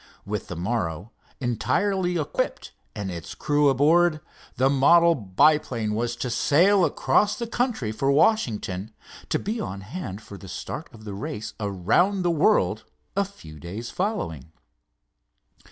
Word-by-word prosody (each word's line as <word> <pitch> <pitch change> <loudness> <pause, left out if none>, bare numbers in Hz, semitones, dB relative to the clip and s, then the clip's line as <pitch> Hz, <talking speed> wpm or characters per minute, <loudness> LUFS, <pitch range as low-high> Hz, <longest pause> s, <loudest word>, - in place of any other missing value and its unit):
With 105 0 -4
the 90 - -6
morrow, 90 0 -3 0.3
entirely 180 - 0
equipped 150 - -2 0.2
and 95 -2 -4
its 85 -3 -7
crew 145 -1 +2
aboard, 155 +4 +4 0.4
the 130 - +3
model 170 +5 +5
biplane 115 - +2
was 120 +2 -1
to 120 0 -3
sail 180 - +4
across 205 +3 +2
the 235 - -4
country 230 - -1
for 135 +5 0
Washington, 110 - +1 0.4
to - - +2
be 220 +3 -3
on 100 - -5
hand 100 - -6
for 105 -2 -11
the 95 - -11
start - - -6
of 110 -1 -14
the 105 -2 -6
race 105 +2 -5
around 110 - +1
the 175 - +2
world 170 +7 +2 0.3
a 200 - +3
few 80 - -12
days 100 +10 -6
following. 85 - -3
120 Hz, 140 wpm, -25 LUFS, -, 0.4 s, model